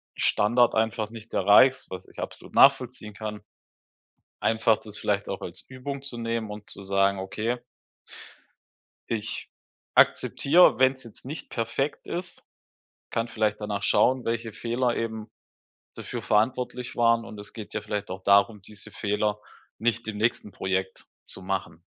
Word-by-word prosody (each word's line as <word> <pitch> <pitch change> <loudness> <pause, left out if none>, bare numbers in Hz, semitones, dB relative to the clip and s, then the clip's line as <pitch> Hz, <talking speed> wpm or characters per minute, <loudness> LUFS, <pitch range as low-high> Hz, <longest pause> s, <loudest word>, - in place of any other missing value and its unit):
Standard 120 +3 +3
einfach 110 -1 0
nicht 115 0 -11
erreichst, 115 +7 +5
was 95 0 -8
ich - - -13
absolut - - -7
nachvollziehen 125 -5 +4
kann, 105 0 -6 1.0
einfach, 110 -1 +3
das 105 -2 -9
vielleicht - - -1
auch - - -4
als - - -6
Übung 135 +2 -6
zu 135 -4 -5
nehmen 115 -2 -2
und 105 0 -9
zu - - -5
sagen: 100 0 +2
„Okay 110 +6 -2 1.5
ich 110 -2 -3 0.5
akzeptiere, 145 -5 +5
wenn's 130 0 +3
jetzt 115 0 -14
nicht 150 +4 -7
perfekt 125 +5 -2
ist. 175 0 -5 0.7
Kann 115 +1 -1
vielleicht 110 -2 0
danach 105 -1 -3
schauen, 130 +3 +3
welche 115 -1 -2
Fehler 120 +2 -1
eben 110 -1 -4 0.6
dafür - - -6
verantwortlich 125 +3 0
waren, 115 -1 +3
und 105 - -10
es 105 0 -10
geht 110 -3 -9
ja 110 - -2
vielleicht 105 -1 -4
auch 95 0 -6
darum, 100 +1 +4
diese 105 +1 -12
Fehler 105 0 -1 0.4
nicht 115 0 0
im 110 - -4
nächsten 110 -1 0
Projekt 95 0 -3 0.2
zu - - -6
machen.” 95 -3 -3
110 Hz, 145 wpm, -26 LUFS, 105-120 Hz, 1.5 s, erreichst